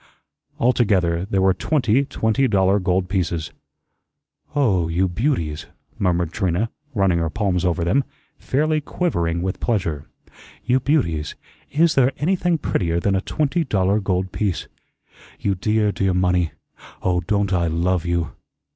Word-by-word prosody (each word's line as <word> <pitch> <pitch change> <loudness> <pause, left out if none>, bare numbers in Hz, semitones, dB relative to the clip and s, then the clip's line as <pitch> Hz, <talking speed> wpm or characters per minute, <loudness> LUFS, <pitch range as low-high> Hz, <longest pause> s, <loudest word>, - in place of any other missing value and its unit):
Altogether 95 -8 +2
there 95 -1 0
were 95 0 +4
twenty 135 +1 +1
twenty 130 -1 +1
dollar 100 -2 +3
gold 90 -1 0
pieces. 85 -5 -2 1.0
"Oh 95 - +2
h, 80 - -4
you 95 +2 +3
beauties!" 90 - -1 0.3
murmured 90 -3 +1
Trina, 95 +3 0 0.2
running 95 -4 +2
her 80 -1 0
palms 95 -1 0
over 90 -1 0
them, 100 +12 +2 0.4
fairly 155 +3 0
quivering 85 - -1
with 95 0 -3
pleasure. 85 - -1 0.6
"You 125 +2 +3
beauties! 85 - 0 0.3
IS 160 +2 +3
there 135 -1 +3
anything 175 +1 +1
prettier 85 - 0
than 100 +3 +1
a 95 - +1
twenty 155 - 0
dollar 100 -5 +1
gold 95 -2 -1
piece? 100 -5 -2 0.7
You 100 - 0
dear, 105 +2 +1
dear 95 -2 0
money! 90 -2 +2 0.5
Oh, 90 -1 +2
don't 100 +2 0
I 85 -2 +2
LOVE 85 +2 0
you! 85 -1 -1
95 Hz, 140 wpm, -21 LUFS, 85-120 Hz, 1.0 s, were